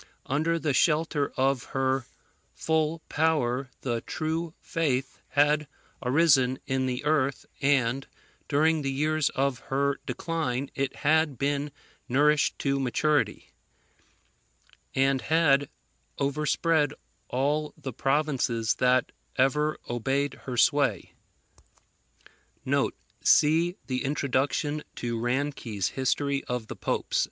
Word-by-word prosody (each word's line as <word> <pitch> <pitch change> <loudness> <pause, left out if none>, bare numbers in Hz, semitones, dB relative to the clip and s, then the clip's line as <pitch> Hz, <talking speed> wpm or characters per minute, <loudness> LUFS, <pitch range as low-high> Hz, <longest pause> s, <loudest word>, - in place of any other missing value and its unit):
Under 160 +5 +1
the 155 -3 0
shelter 150 +1 +2
of 130 -1 +2
her 130 -1 +1 0.5
full 160 0 0
power 140 -5 +1
the 120 -3 -2
True 160 +4 -3
Faith 135 -5 -1
had 150 +1 +2 0.3
arisen 130 -1 +3
in 130 0 0
the 125 +2 -3
earth 140 -3 +1 0.2
and 135 -2 +2 0.4
during 155 +2 +2
the 135 -1 -1
years 155 +1 +1
of 135 -2 0
her 140 +1 +1
decline 140 -6 -2
it 135 -1 -2
had 155 -2 +3
been 140 +3 -1 0.4
nourished 150 +3 +3
to 140 -1 0
maturity, 145 +3 0 1.4
and 135 0 +2
had 145 -4 +3 0.5
overspread 150 +1 +1 0.3
all 145 +4 -1
the 140 -4 -6
provinces 135 -5 +1
that 125 0 +3 0.2
ever 150 +4 +2
obeyed 135 +4 -1
her 125 -2 -4
sway. 135 - +2 2.1
[See 165 +4 +4
the 130 -1 -2
Introduction 140 +2 0
to 120 -1 -3
Ranke's 120 -5 -1
History 140 +1 0
of 125 -2 -3
the - - -5
Popes. - - -1
140 Hz, 105 wpm, -27 LUFS, 130-150 Hz, 2.1 s, See